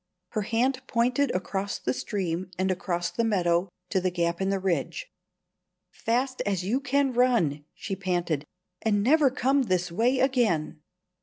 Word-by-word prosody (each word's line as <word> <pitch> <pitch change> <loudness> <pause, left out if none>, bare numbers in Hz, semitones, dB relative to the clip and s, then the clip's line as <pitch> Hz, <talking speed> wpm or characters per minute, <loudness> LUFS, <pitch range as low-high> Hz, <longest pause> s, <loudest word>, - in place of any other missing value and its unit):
Her 215 - -2
hand 250 +5 0
pointed 250 +4 +2
across 195 +2 -2
the 125 - -1
stream, 180 +1 -3
and 190 +1 +1
across 175 -1 -2
the 230 - -1
meadow, 180 -4 +1 0.2
to 190 - +2
the 185 - +1
gap 170 0 -1
in 190 - +1
the 195 - +1
ridge. 190 - -1 0.9
"Fast 255 +3 -1
as 195 -3 -1
you 235 +7 +1
can 275 0 +1
run," 225 - +2
she 195 - -4
panted; 175 -6 -1 0.4
"and 205 -2 +1
never 290 +3 +5
come 270 +1 +2
this 185 -7 0
way 240 +9 +2
again." 220 - +1
200 Hz, 155 wpm, -27 LUFS, 175-250 Hz, 0.9 s, never